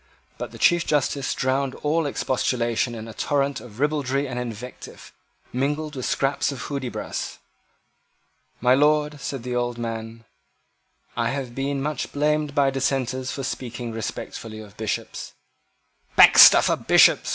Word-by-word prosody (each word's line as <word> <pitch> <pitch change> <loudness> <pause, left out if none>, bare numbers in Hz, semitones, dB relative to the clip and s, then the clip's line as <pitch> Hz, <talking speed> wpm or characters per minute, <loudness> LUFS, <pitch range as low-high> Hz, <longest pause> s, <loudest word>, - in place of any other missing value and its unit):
But - - -4
the - - -12
Chief 175 0 +4
Justice 145 -3 0
drowned 130 +1 0
all 155 +1 +1
expostulation 120 -3 -1
in 110 0 -7
a 110 - -9
torrent 140 +1 0
of 110 -1 -13
ribaldry 145 -1 0
and 125 -1 -4
invective, 125 0 -8 0.4
mingled 150 +4 -2
with 130 - -3
scraps 140 +1 0
of 135 - -7
Hudibras. 135 -4 -4 1.2
"My 125 +1 +4
Lord," 150 +1 +2
said 135 -4 -5
the 125 0 -3
old 120 -1 -1
man, 115 -1 -5 0.9
"I 115 -1 0
have 130 -2 -4
been 135 +1 -2
much 150 -2 -3
blamed 150 0 0
by 140 -2 +3
Dissenters 130 -1 -1
for 140 -4 -5
speaking 120 -2 -5
respectfully 110 0 -6
of 105 -1 -12
Bishops." 110 -1 -4 0.8
"Baxter - - +9
for - - +2
Bishops!" - - +4
130 Hz, 140 wpm, -24 LUFS, 120-145 Hz, 1.2 s, Baxter